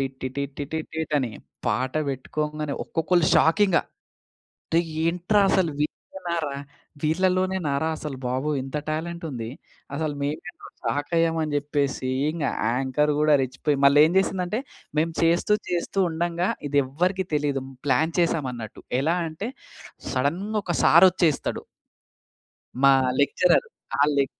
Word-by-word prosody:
T 135 - +1
T 130 - -2 0.3
T 145 - -2 0.3
tit 160 -1 -3
అని. 130 -4 -1 0.4
పాట 130 +1 0
పెట్టుకోంగానే 150 +2 -3
ఒక్కొక్కళ్ళు 170 0 +1
షాక్ 165 +5 +4
ఇంగ. 185 -3 +2 1.0
రేయ్! 165 0 +2 0.2
ఏంట్రా 180 +5 +2
అసలు 175 -4 +2
వీళ్ళేనారా? 165 -1 -3 0.5
వీళ్ళలోనేనారా 180 -2 +1
అసలు 150 -4 -6
బాబోయ్! 135 +4 -1
ఇంత 135 +3 -4
టాలెంట్ 170 +2 -3
ఉంది! 115 -3 -5 0.5
అసలు 155 0 -1
మేము 145 +2 -2 0.4
షాక్ 145 +2 -1
అయ్యామని 165 -2 +1
చెప్పేసి 145 -2 -1 0.2
ఇంగ 155 -2 -2 0.3
యాంకర్ 135 +4 +1
గూడా 150 0 +4
రెచ్చిపోయి 135 +3 -1
మళ్ళీ 140 +1 +6
ఏం 160 - +1
చేసిందంటే 190 +2 0 0.4
మేము 165 +2 +2
చేస్తూ 170 +5 +3 0.2
చేస్తూ 175 +2 -1
ఉండంగా 170 +2 -1 0.2
ఇది 145 0 +3
ఎవ్వరికీ 180 +8 0
తెలీదు. 145 -2 0 0.2
ప్లాన్ 145 +4 +2
చేసాం 165 -5 +1
అన్నట్టు. 110 -3 -8 0.2
ఎలా 160 +5 +2
అంటే 170 +9 -5 0.6
సడన్‌గా 175 +12 -1
ఒక 175 -3 -2
సార్ 170 +4 +8
వచ్చేస్తాడు. 170 -5 0 1.2
మా 135 0 +8 0.3
లెక్చరర్. 175 - +3 0.3
ఆ - - +5
లె 140 -1 +3
155 Hz, 130 wpm, -25 LUFS, 140-170 Hz, 1.2 s, సార్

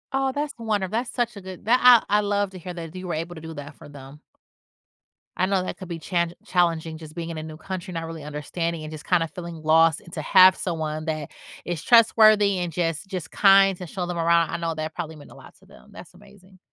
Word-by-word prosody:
Oh, 270 0 +1
that's 290 +1 -3
wonder 210 -4 -1
that's 235 +6 -2
such 240 -2 -2
a 200 - -8
good 185 0 -10
that 245 +3 +4
I 235 -4 +6
I - - +3
love 205 -1 -1
to 185 - -10
hear 180 +1 -7
that 165 0 -8
you 185 0 -7
were 170 - -2
able 165 +3 -4
to 160 - -10
do 160 0 -8
that 145 +1 -8
for - - -14
them. 140 +1 -12 1.2
I 185 - +2
know 190 -2 +1
that - - -5
could 185 - -9
be 170 -1 -6
challenge 170 +1 -1
challenging 165 -3 0
just 155 -1 -12
being 170 -1 -5
in 165 - -6
a 155 - -5
new 155 0 -9
country, 185 +3 -6
not 165 -1 -4
really 165 -2 -8
understanding 155 +3 -4
and 155 - -7
just 155 -1 -9
kinda 170 -3 +2
feeling 170 -2 -8
lost, 160 0 +4
and 170 - -16
to 155 - -4
have 185 +3 +7
someone 155 -3 -4
that 155 -3 -4 0.3
is 175 -3 -4
trustworthy 215 -4 +5
and 175 -1 -3
just 165 +2 -2
just 180 -4 -6
kind 195 -2 +5
to 180 - -8
show 180 +2 -4
them 175 -1 -4
around, 170 0 +2
I - - -2
know 165 -1 -3
that 155 0 -4
probably 160 -2 -5
meant 145 - -14
a - - -14
lot - - -15
to - - -23
them. 60 - -19
That's 180 - -13
amazing. 190 -1 -19
175 Hz, 250 wpm, -24 LUFS, 160-195 Hz, 1.2 s, have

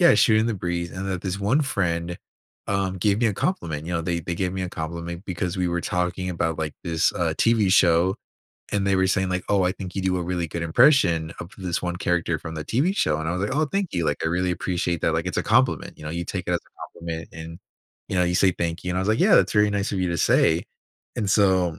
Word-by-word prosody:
yeah, 175 - +7
shooting 110 0 +4
the 115 - 0
breeze 85 -2 -3
and 95 +1 -5
that 90 -2 -3
this 95 0 -3
1 115 +10 +2
friend, 85 -8 -1 0.5
um, 95 -1 -1
gave 100 +2 +2
me 120 - +3
a 105 - +1
compliment. 80 - -2
You 90 - -4
know, 85 - 0
they 85 +1 -1
they 85 +2 -4
gave 90 +1 -1
me 95 -1 -3
a 90 - -3
compliment 85 +2 -5
because 90 0 -3
we 90 -1 0
were 85 0 -1
talking 90 +1 -1
about, 80 -2 -1
like, 75 -2 -3
this, 80 -1 +1
uh, 85 -2 0
TV 110 -5 +3
show 90 -1 +4 0.6
and 100 -1 0
they 100 - +3
were 95 0 +3
saying, 95 0 +1
like, 90 0 -1
"Oh, 100 -2 +3
I 90 - +2
think 95 -2 -8
you 95 - -1
do 95 -1 +1
a - - -2
really 85 -1 -2
good 85 +2 -4
impression 85 - +4
of 85 - -8
this 90 -3 -2
one 90 0 -2
character 90 -3 0
from 80 +1 -7
the 80 -1 -5
TV 150 +11 +1
show." 75 0 +1
And 80 0 -3
I - - 0
was 90 - -2
like, 105 - -1
"Oh, 155 - +3
thank 195 +4 -2
you. 85 -2 0
Like, 70 - 0
I - - +2
really 90 +2 0
appreciate 85 -1 -2
that." - - +2
Like, - - -1
it's - - -3
a - - +1
compliment, - - +1
you - - -10
know, 75 - -4
you 85 +1 -3
take 90 +1 -4
it 90 - +1
as 85 - 0
a - - -12
compliment 80 -1 -5
and, 80 +1 -9 0.5
you - - -3
know, 90 - +4
you 90 0 0
say 95 -1 +4
thank 85 0 -3
you. 90 - -2
And 90 - -1
I - - +1
was 95 - -1
like, 110 +2 +2
"Yeah, - - +6
that's - - +3
very 105 0 +4
nice 100 -1 -1
of 100 - -1
you 90 - 0
to 85 - -1
say." 80 +2 +3 0.5
And 105 -5 -1
so 95 -5 +3
90 Hz, 275 wpm, -24 LUFS, 85-100 Hz, 0.6 s, yeah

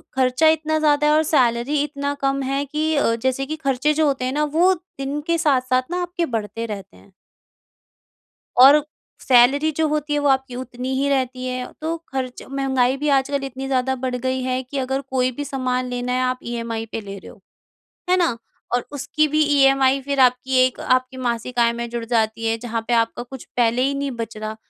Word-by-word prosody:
ख़र्चा 260 +4 +3
इतना 315 0 +2
ज़्यादा 300 -1 +3
है 300 - +4
और 310 +1 +4
सैलरी 255 +1 +2
इतना 285 -1 -3
कम 275 0 0
है 275 +2 -1
कि 310 +2 -1
अ, 230 -5 +2
जैसे 260 +3 -1
कि 310 +3 -4
ख़र्चे 275 +3 +1
जो 310 0 +2
होते 265 -2 -1
हैं 255 - -1
ना 300 +1 +1
वो 370 +2 +5
दिन 295 -5 -6
के 335 0 +2
साथ-साथ 255 -4 +2
न - - -1
आपके 350 -1 -2
बढ़ते 220 +2 -3
रहते 200 -3 -8
हैं। 200 - -20 1.5
और 280 +3 +8 0.4
सैलरी 270 +5 +5
जो 320 -1 +2
होती 300 0 -1
है 295 - +1
वो 290 - +1
आपकी 265 -2 0
उतनी 255 +1 -5
ही 280 - +1
रहती 255 -2 -1
है। 250 0 -3
तो 325 +1 -2
ख़र्च 260 -2 -4
महँगाई 265 -1 +1
भी 295 +1 -1
आजकल 275 +1 -1
इतनी 270 0 -5
ज़्यादा 265 0 0
बढ़ 250 -1 -1
गई 260 +1 -2
है 255 0 -1
कि 275 +3 -7
अगर 265 +1 -1
कोई 255 -1 +1
भी 290 +4 -5
सामान 255 -2 -2
लेना 245 0 -3
है 255 - +1
आप 255 0 -1
ईएमआई 230 -1 -4
पे 225 - -4
ले 200 -1 -8
रहे - - -12
हो। 205 - -19 0.7
है 365 - +4
ना? 330 -10 +1 0.4
और 245 - -1
उसकी 305 +2 0
भी 305 +1 +1
ईएमआई 275 -2 +3
फिर 280 +1 -2
आपकी 255 +1 +3
एक 255 - -3
आपकी 255 0 0
मासिक 240 0 -2
आय 235 0 +4
में 235 0 -5
जुड़ 235 -1 -4
जाती 225 -1 0
है 225 0 0
जहाँ 230 -1 -4
पे 240 - +1
आपका 230 +1 +1
कुछ 260 0 -10
पहले 240 +1 +2
ही 275 +2 +1
नहीं 280 -1 -2
बच 230 -2 -6
रहा। 215 0 -5
260 Hz, 210 wpm, -21 LUFS, 245-285 Hz, 1.5 s, और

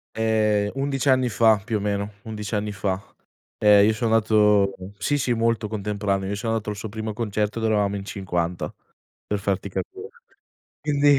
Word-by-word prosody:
Ehm, 110 -2 +2
11 135 -1 -1
anni 130 -1 +4
fa 110 +1 +4
più 110 0 -1
o - - -3
meno, 100 0 -2
11 105 -1 -4
anni 105 0 -1
fa. 95 -1 -2 0.6
E 105 -1 +6
io 110 - +3
so' 110 +2 -1
nato 105 -3 +4 0.2
sì, 145 +8 0
sì 125 -3 +1
molto 115 -1 +1
contemporaneo, 100 -2 -2
io 100 - -1
so' 115 +2 -2
nato 110 -1 -1
il 105 - -3
suo 105 +2 -6
primo 110 +1 -4
concerto 105 0 -1
dove 110 -1 +1
eravamo 100 -1 +1
in 100 -1 -5
50 90 -3 -3 0.5
per 105 - -1
farti 100 -1 -2
capire. 390 - -6 0.7
Quindi 145 -1 +4
105 Hz, 175 wpm, -24 LUFS, 100-115 Hz, 0.7 s, E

